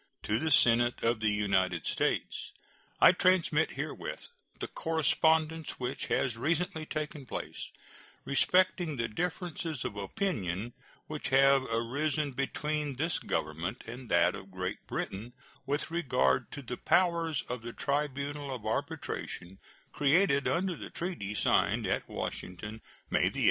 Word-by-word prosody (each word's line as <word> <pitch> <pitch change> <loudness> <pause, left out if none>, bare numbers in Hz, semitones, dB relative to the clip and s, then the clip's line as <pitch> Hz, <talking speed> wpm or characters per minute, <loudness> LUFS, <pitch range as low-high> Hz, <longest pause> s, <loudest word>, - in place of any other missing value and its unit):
To 105 +2 +1
the 160 - 0
Senate 120 -3 +4
of 115 0 +2
the 110 -1 +2
United 95 -4 +1
States: - - -1 0.5
I - - +9
transmit 185 -1 +3
herewith - - -5 0.3
the - - -3
correspondence 160 0 +1
which 125 +2 -3
has 130 -4 +1
recently 160 +3 -1
taken 150 -3 -4
place - - -5 0.6
respecting 175 +2 +3
the 115 0 0
differences 170 - -3
of - - -3
opinion 100 - -2 0.3
which 155 -1 -4
have 135 +1 +6
arisen 140 +6 0
between 145 +2 -2
this 160 +6 0
Government 80 +5 -3
and 120 +1 -8
that 85 0 +4
of 95 - -9
Great 95 0 -4
Britain 110 +6 -4 0.3
with 145 +3 -1
regard 125 - +2
to 145 - -6
the 125 0 -5
powers 170 -4 +2
of 125 -1 -4
the 120 +1 -6
tribunal 140 0 -2
of 110 -4 -9
arbitration 95 -3 -3 0.3
created 145 -1 +3
under 180 +1 +1
the - - -8
treaty 165 - -4
signed - - +2
at - - -1
Washington 105 +5 -5 0.3
May - - +3
8, - - -13
1871. - - -1
135 Hz, 135 wpm, -31 LUFS, 110-160 Hz, 0.6 s, I